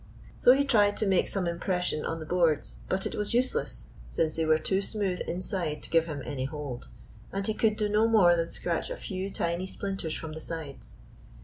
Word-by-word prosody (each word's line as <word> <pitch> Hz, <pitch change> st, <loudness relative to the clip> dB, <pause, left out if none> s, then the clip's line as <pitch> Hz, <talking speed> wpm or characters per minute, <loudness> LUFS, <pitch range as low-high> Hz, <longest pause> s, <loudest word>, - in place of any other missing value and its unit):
So 250 Hz, -, +6 dB
he 280 Hz, +1 st, +2 dB
tried 205 Hz, -6 st, +4 dB
to 215 Hz, -, +1 dB
make 190 Hz, -2 st, +3 dB
some 195 Hz, -3 st, -1 dB
impression 170 Hz, -2 st, -1 dB
on 165 Hz, -, -2 dB
the 155 Hz, -, -6 dB
boards. 165 Hz, -3 st, +1 dB
But 190 Hz, +1 st, +1 dB
it -, -, -2 dB
was 210 Hz, +2 st, 0 dB
useless, 255 Hz, -, 0 dB, 0.2 s
since 160 Hz, -1 st, 0 dB
they 160 Hz, -, 0 dB
were 155 Hz, 0 st, +4 dB
too 190 Hz, +5 st, 0 dB
smooth 195 Hz, -3 st, -1 dB
inside 175 Hz, -3 st, -2 dB
to -, -, -8 dB
give 165 Hz, 0 st, +4 dB
him 145 Hz, -4 st, -5 dB
any 135 Hz, -3 st, -3 dB
hold, 140 Hz, -4 st, -6 dB, 0.4 s
and 195 Hz, 0 st, -2 dB
he 220 Hz, -, +1 dB
could 215 Hz, 0 st, +2 dB
do 210 Hz, -, +1 dB
no 210 Hz, +2 st, +3 dB
more 195 Hz, -6 st, +6 dB
than 165 Hz, 0 st, -1 dB
scratch -, -, -1 dB
a -, -, -4 dB
few 190 Hz, -1 st, -4 dB
tiny 170 Hz, 0 st, -2 dB
splinters 195 Hz, -5 st, -3 dB
from 160 Hz, -, -6 dB
the 160 Hz, -, -7 dB
sides. 155 Hz, -4 st, -6 dB
180 Hz, 210 wpm, -29 LUFS, 160-205 Hz, 0.4 s, So